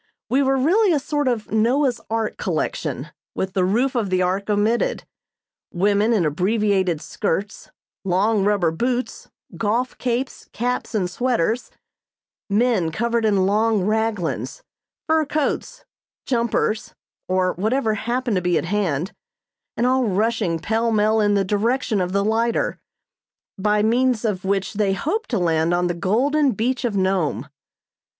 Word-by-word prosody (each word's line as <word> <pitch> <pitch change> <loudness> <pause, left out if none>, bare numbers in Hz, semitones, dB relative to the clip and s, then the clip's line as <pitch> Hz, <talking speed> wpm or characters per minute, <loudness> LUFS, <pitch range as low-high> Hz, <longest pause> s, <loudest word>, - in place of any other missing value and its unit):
We 265 +3 +3
were 270 0 +2
really 370 +10 +3
a 295 - +2
sort 290 0 -1
of 235 -4 -1
Noah's 240 +4 +2
Ark 225 -1 -1
collection, - - -2 0.3
with 190 0 -2
the 185 - +1
roof 235 +8 +1
of 230 -6 -1
the 185 0 +2
Ark 190 +3 -1
omitted. 220 - +1 0.7
Women 205 +4 +2
in 205 -7 +2
abbreviated 190 +1 +1
skirts, 200 +6 -3 0.3
long 195 +3 +2
rubber 200 -5 +2
boots, 245 +9 -2 0.3
golf 230 +4 0
capes, 250 +2 -3
caps 245 0 -2
and 190 -4 +1
sweaters; 235 +2 -1 0.8
men 205 -5 +2
covered 235 +4 0
in 200 -3 +3
long 215 0 +2
"raglans," 205 - -1 0.4
fur 320 0 +2
coats, 310 - -2 0.4
"jumpers," 230 -3 -1 0.3
or 185 0 +1
whatever 220 +4 0
happened 235 0 -1
to - - 0
be 180 -1 +1
at - - -1
hand; 180 -4 -1 0.6
and 240 - +1
all 255 0 +2
rushing 210 -3 0
pell 225 +6 0
mell 215 0 +3
in 205 -1 +2
the 195 -1 +2
direction 215 +2 0
of 180 0 -2
the 200 +1 +1
lighter, 230 +2 0 0.8
by 210 +1 +1
means 245 +1 +2
of 200 -3 -1
which 195 +1 -1
they 200 -2 +1
hoped 345 - -2
to 235 - 0
land 165 -1 +1
on 180 0 +1
the 175 - 0
golden 255 - +1
beach 240 +5 -1
of 215 -4 -1
Nome. 180 - 0
215 Hz, 145 wpm, -22 LUFS, 190-240 Hz, 0.8 s, We